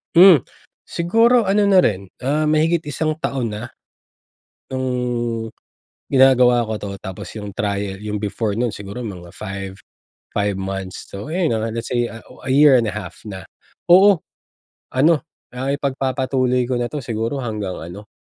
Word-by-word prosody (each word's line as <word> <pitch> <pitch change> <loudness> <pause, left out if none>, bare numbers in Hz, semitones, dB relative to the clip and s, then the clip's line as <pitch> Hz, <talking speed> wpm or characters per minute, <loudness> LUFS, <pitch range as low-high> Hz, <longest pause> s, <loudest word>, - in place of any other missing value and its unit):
Hmm, 170 - +8 0.4
siguro 230 +8 +3
ano 205 +1 +3
na 195 -2 +6
rin, 100 - 0 0.2
ah, 150 +4 +1
mahigit 155 +2 +2
isang 155 +2 -2
taon 130 -7 -2
na. 105 +2 -5 1.0
No'ng 125 -3 -2 0.6
ginagawa 125 -3 +5
ko 110 -1 -4
'to, 100 -1 -5
tapos 95 -1 -8
yung 105 -1 -6
trial 100 -1 -2
yung 105 0 -4
before 105 +1 -2
no'n 120 -2 0
siguro 100 +5 -7
mga 90 -5 -7
5, 95 -2 -6 0.6
5 100 -1 0
months 95 -1 -5
so 100 +8 -7
ayon, 170 -3 0
ah, 110 +1 -2
let's 115 +2 -4
say 120 -1 +1
a 125 +4 -11
year 140 0 +7
and 115 - -1
a - - -4
half 105 - -7
na. 95 -2 -7 0.5
Oo 190 -2 +6 0.7
ano, 150 +4 +4 0.3
ah, 130 +2 -3
ipagpapatuloy 130 -2 0
ko 125 0 -1
na 120 - -2
'to 150 - -5
siguro 115 +3 -3
hanggang 105 -5 -4
ano 95 +5 -9
120 Hz, 150 wpm, -20 LUFS, 105-140 Hz, 1.0 s, Hmm